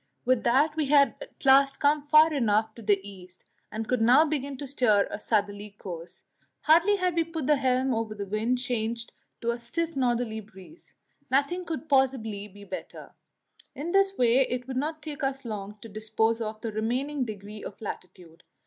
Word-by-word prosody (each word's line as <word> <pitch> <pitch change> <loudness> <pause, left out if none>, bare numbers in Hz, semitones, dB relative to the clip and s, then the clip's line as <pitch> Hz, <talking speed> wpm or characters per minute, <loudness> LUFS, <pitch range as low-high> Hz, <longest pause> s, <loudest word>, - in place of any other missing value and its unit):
With 255 -1 +2
that 280 +6 +3
we 310 -3 0
had 280 -4 +5
at - - -12
last 275 0 +5
come 290 0 +2
far 305 +1 +6
enough 220 -4 +1
to 230 - -12
the 205 -2 +2
east, 185 -2 -13 0.3
and 220 +1 -4
could 250 -2 0
now 250 +7 +6
begin 280 -3 -3
to 285 - -6
steer 245 -7 +2
a - - -5
southerly 205 -1 -2
course; 170 -3 -9 0.4
hardly 340 +6 +5
had 365 -2 0
we 335 0 +2
put 325 -3 -5
the 300 +1 +4
helm 260 0 +1
over 225 -1 -2
before 200 -1 -5
the 195 - -17
wind 225 +4 +1
changed 235 -2 -3 0.3
to 235 - 0
a 235 - -5
stiff 330 +8 -3
northerly 240 -4 0
breeze 210 - -15 0.3
Nothing 285 +7 +1
could 320 -2 -5
possibly 255 -7 +1
be 205 0 -14
better; 190 -2 -8 0.6
in 320 +5 -4
this 390 0 +2
way 245 +1 +4
it 250 0 -3
would 260 -1 -4
not 310 +3 -3
take 305 -1 -6
us 270 -1 -2
long 210 -2 -6
to - - -8
dispose 220 +2 -1
of 215 -1 -4
the 225 - -3
remaining 255 +6 -1
degrees 210 -2 -8
of 200 - -8
latitude. 180 -5 -9
245 Hz, 190 wpm, -27 LUFS, 215-285 Hz, 0.6 s, far